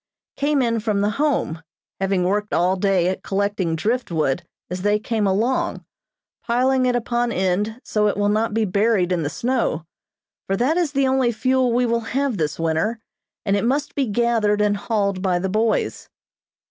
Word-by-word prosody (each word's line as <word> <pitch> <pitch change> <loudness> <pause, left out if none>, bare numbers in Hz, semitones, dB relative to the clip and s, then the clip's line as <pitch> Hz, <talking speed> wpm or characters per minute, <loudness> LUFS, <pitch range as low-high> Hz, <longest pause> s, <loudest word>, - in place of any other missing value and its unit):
came 285 -1 +1
in 230 -1 +1
from 210 -2 0
the 205 +1 +1
Home, 265 - 0 0.4
having 195 -1 +1
worked 205 +3 0
all 180 +2 +2
day 190 -2 +2
at 185 - -2
collecting 195 -4 -1
driftwood 165 - 0 0.3
as 180 +1 -5
they 205 +2 +2
came 215 -1 -1
along, 225 +7 0 0.6
piling 255 +2 +2
it 250 - +1
upon 240 0 0
end 200 +4 -1
so 210 -1 +1
it 205 - 0
will 205 - +1
not 215 +2 +1
be 220 +1 +1
buried 200 -1 +1
in 175 -2 +1
the 145 - -1
snow, 235 - -1 0.6
for 195 - 0
that 260 +8 +2
is 340 -5 0
the 275 -1 +2
only 260 -2 +2
fuel 255 +2 +1
we 245 +1 +2
will 235 0 +1 0.2
have 275 -5 0
this 155 -3 -1
winter, 165 +8 0 0.5
and 200 -1 +2
it 200 - 0
must 280 +5 0
be 275 -3 0
gathered 220 -1 +1
and 210 -1 +2
hauled 200 -3 -1
by 185 -2 +1
the 190 +2 -2
boys. 220 +3 0
210 Hz, 180 wpm, -22 LUFS, 190-240 Hz, 0.6 s, all